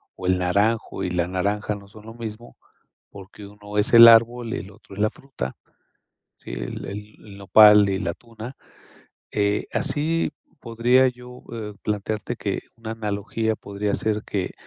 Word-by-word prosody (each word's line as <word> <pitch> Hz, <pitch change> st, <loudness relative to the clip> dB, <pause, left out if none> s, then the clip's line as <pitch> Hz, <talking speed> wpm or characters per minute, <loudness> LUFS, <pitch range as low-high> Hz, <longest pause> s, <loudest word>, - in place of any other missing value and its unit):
o 95 Hz, -, -8 dB
el 90 Hz, 0 st, +3 dB
naranjo 100 Hz, +3 st, 0 dB
y 90 Hz, -, -1 dB
la 90 Hz, -1 st, 0 dB
naranja 100 Hz, +3 st, -1 dB
no 100 Hz, -1 st, -12 dB
son 105 Hz, +1 st, -15 dB
lo 110 Hz, -, -9 dB
mismo, 115 Hz, 0 st, -8 dB, 0.5 s
porque 100 Hz, +1 st, -12 dB
uno 105 Hz, 0 st, -9 dB
es 105 Hz, -, +1 dB
el 115 Hz, 0 st, +11 dB
árbol 115 Hz, +1 st, +5 dB
y -, -, -2 dB
el 100 Hz, -, -10 dB
otro 100 Hz, -1 st, -15 dB
es 105 Hz, -, -4 dB
la 110 Hz, -, +3 dB
fruta. 120 Hz, -, -7 dB, 0.8 s
Sí, -, -, -10 dB
el -, -, -5 dB
el 105 Hz, +2 st, -8 dB
el 100 Hz, -2 st, -12 dB
nopal 105 Hz, +1 st, +7 dB
y 95 Hz, -1 st, -1 dB
la 85 Hz, -, -2 dB
tuna, 115 Hz, +4 st, -11 dB, 0.8 s
eh, 105 Hz, 0 st, 0 dB
así 150 Hz, +2 st, 0 dB, 0.3 s
podría 120 Hz, +3 st, +3 dB
yo, 125 Hz, 0 st, -13 dB
eh, 105 Hz, -2 st, -6 dB
plantearte 105 Hz, +3 st, -3 dB
que 100 Hz, -3 st, -3 dB, 0.2 s
una 110 Hz, -1 st, -7 dB
analogía 110 Hz, 0 st, -2 dB
podría 100 Hz, 0 st, -3 dB
ser 105 Hz, -1 st, -2 dB
que 95 Hz, -3 st, -3 dB
105 Hz, 170 wpm, -23 LUFS, 100-115 Hz, 0.8 s, el